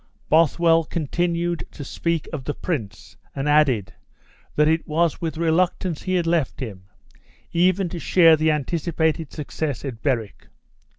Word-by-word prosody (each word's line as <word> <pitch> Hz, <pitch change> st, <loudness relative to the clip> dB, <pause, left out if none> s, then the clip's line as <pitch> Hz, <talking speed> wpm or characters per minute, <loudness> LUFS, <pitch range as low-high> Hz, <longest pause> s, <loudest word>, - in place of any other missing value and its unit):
Bothwell 165 Hz, +1 st, +4 dB
continued 170 Hz, +2 st, -1 dB
to 145 Hz, -, -7 dB
speak 165 Hz, +3 st, -2 dB
of 145 Hz, -4 st, -4 dB
the 145 Hz, -, -3 dB
prince, 110 Hz, -, -5 dB, 0.2 s
and 135 Hz, +1 st, -2 dB
added, 145 Hz, -9 st, +3 dB, 0.6 s
that 150 Hz, 0 st, +4 dB
it 160 Hz, +1 st, +1 dB
was 165 Hz, +1 st, 0 dB
with 165 Hz, -1 st, -3 dB
reluctance 170 Hz, 0 st, 0 dB
he 185 Hz, -1 st, -1 dB
had 175 Hz, -2 st, +1 dB
left 165 Hz, -5 st, 0 dB
him, 100 Hz, -8 st, -7 dB, 0.7 s
even 185 Hz, +2 st, +2 dB
to 175 Hz, -, -6 dB
share 165 Hz, -1 st, +5 dB
the 155 Hz, +1 st, +1 dB
anticipated 160 Hz, +1 st, -1 dB
success 145 Hz, -3 st, -4 dB
at 120 Hz, -5 st, -6 dB
Berwick. 120 Hz, -7 st, -2 dB
160 Hz, 140 wpm, -23 LUFS, 145-170 Hz, 0.7 s, share